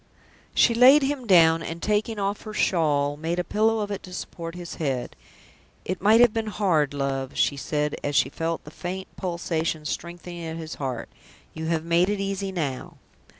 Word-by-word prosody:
She 235 - +5
laid 260 +5 +7
him 270 -3 -2
down, 165 -4 +6
and, 165 0 -5
taking 210 +3 0
off 200 0 -2
her 215 -1 -8
shawl, 145 -7 +2
made 165 +3 -2
a 180 - 0
pillow 220 +3 +1
of 205 0 -3
it 200 - -4
to 185 - -11
support 165 -1 -6
his 175 -1 -7
head. 135 -5 -2 0.7
"It 185 0 -3
might 215 +3 +6
have 240 -3 +6
been 225 -1 -2
hard, 170 -9 +1
love," 135 -1 -2
she 145 - +2
said, 150 +1 -1
as 145 0 -2
she 135 - +4
felt 165 +3 -3
the 150 - -11
faint 185 +4 -6
pulsation 165 -3 -2
strengthening 175 +2 -6
at 160 0 -5
his 160 -1 -6
heart. 130 -4 -3 0.5
"You 160 0 -5
have 165 -1 -1
made 170 +3 +3
it 205 -1 -1
easy 195 0 -2
now." 145 -8 -4
170 Hz, 190 wpm, -25 LUFS, 155-200 Hz, 0.7 s, laid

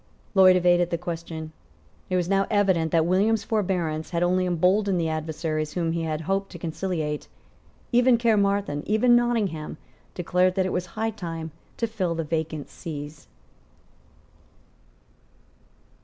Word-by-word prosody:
Lloyd 190 -2 +7
evaded 175 -1 +3
the 170 - -1
question. 165 -2 -6 0.6
It 185 - 0
was 180 -2 +1
now 195 +1 +2
evident 190 -7 +2
that 165 -2 +3
William's 205 +5 +2
forbearance 180 -8 -1
had 170 0 0
only 185 +1 +2
emboldened 185 +2 +2
the 165 -1 0
adversaries 155 -1 -3
whom 170 -2 -1
he 165 0 -1
had 160 -1 -2
hoped 195 +4 -2
to - - -7
conciliate. 160 -2 -3 0.6
Even 245 0 +5
Caermarthen, 200 -8 +1
even 230 +3 +4
Nottingham, 215 -12 0 0.4
declared 180 +1 +1
that 190 -1 +1
it 185 - -2
was 180 0 -2
high 225 +1 0
time 165 -6 -6 0.3
to 230 - 0
fill 190 -7 -2
the 165 - -2
vacant 155 -1 -3
sees. 150 - -8
180 Hz, 140 wpm, -25 LUFS, 160-200 Hz, 0.6 s, Lloyd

